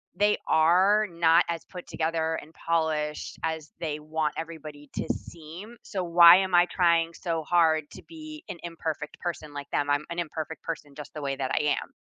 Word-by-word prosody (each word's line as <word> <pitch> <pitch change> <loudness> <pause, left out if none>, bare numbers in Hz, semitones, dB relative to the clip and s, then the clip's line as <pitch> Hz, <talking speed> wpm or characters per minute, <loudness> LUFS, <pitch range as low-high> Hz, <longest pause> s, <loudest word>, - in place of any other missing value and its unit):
they 205 +2 +3
are 185 +7 +4
not 165 0 +4
as 165 -1 -3
put 180 -2 -10
together 160 0 -1
and 155 - -15
polished 160 -3 -2
as 160 -1 -3
they 155 -3 -3
want 155 0 -2
everybody 155 -3 -8
to - - -1
seem, 175 +8 -10
so, 190 -3 -4
why 170 0 +8
am 190 -2 +1
I 175 0 +6
trying 170 -2 +2
so 165 -1 -3
hard 160 -1 +3
to - - -11
be 310 -1 -10
an - - -5
imperfect 160 -3 -5
person 155 -4 -5
like 145 -1 -7
them? 145 - 0
I'm 145 +1 +1
an 170 - -5
imperfect 160 -1 -5
person 145 -3 -6
just 150 0 -10
the 150 - -5
way 140 -1 -2
that 130 -2 -2
I 150 - +2 0.2
am, - - -10
165 Hz, 190 wpm, -27 LUFS, 155-175 Hz, 0.2 s, why